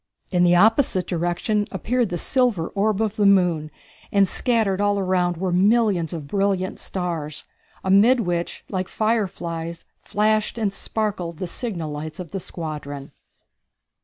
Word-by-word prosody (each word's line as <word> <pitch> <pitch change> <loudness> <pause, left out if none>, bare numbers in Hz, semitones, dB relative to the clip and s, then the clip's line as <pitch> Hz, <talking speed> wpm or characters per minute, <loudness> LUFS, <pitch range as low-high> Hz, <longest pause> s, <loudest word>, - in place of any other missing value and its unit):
In 180 -2 +3
the 175 0 +5
opposite 215 0 +4
direction 175 +5 -1
appeared 230 +4 0
the 175 - -2
silver 235 - +1
orb 215 +1 +1
of 215 0 -2
the 205 - +3
moon, 175 -6 +3 0.4
and 200 -1 +4
scattered 215 -4 +1
all 205 0 +2
around 180 -2 +1
were 185 +1 -1
millions 195 -2 +3
of 160 -4 -5
brilliant 195 +1 0
stars, 165 -5 -3 0.4
amid 210 +7 +5
which, 175 -3 -2
like 185 -2 -3
fireflies, 170 -7 -2 0.2
flashed 215 +2 0
and 210 -4 0
sparkled 195 -6 -2
the 185 - -3
signal 175 - -4
lights 155 +2 -6
of 175 -4 -7
the 195 - -3
squadron. 150 -5 -6
190 Hz, 140 wpm, -23 LUFS, 170-210 Hz, 0.4 s, the